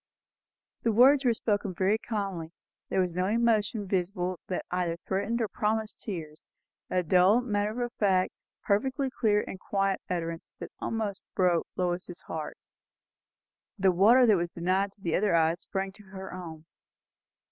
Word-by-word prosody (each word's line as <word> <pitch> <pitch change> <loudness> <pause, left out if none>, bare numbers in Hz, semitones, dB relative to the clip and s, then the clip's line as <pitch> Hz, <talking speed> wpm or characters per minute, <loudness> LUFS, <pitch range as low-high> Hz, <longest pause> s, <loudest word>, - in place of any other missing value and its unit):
The 230 - +2
words 260 +6 +6
were 240 - +5
spoken 205 -4 -1
very 195 +4 +2
calmly; 195 -8 -3 0.4
there - - +1
was 180 -2 +1
no 180 +2 0
emotion 220 -2 +1
visible 180 -1 -1
that 185 - -3
either 175 -2 -1
threatened 200 +5 -1
or 225 - +1
promised 220 +1 -2
tears; 160 -7 -6 0.5
a 180 -1 +1
dull, 185 +6 +5
matter 215 0 -1
of 240 0 -4
fact, 190 -3 +2 0.3
perfectly 260 +6 0
clear 210 -5 +2
and 190 - -7
quiet 195 -1 0
utterance, 165 -2 -4
that - - -8
almost 215 -3 -3
broke 180 -3 +2
Lois's 175 0 -2
heart. 155 -2 -6 1.2
The 190 -1 +4
water 220 +8 +6
that 215 -4 +5
was 170 0 -1
denied 185 +4 0
to 200 - -30
the 170 -4 0
other 200 -3 +2
eyes 165 +1 +2
sprang 195 0 -3
to 210 +2 -17
her 190 0 -8
own. 165 -3 -8
195 Hz, 155 wpm, -29 LUFS, 180-215 Hz, 1.2 s, words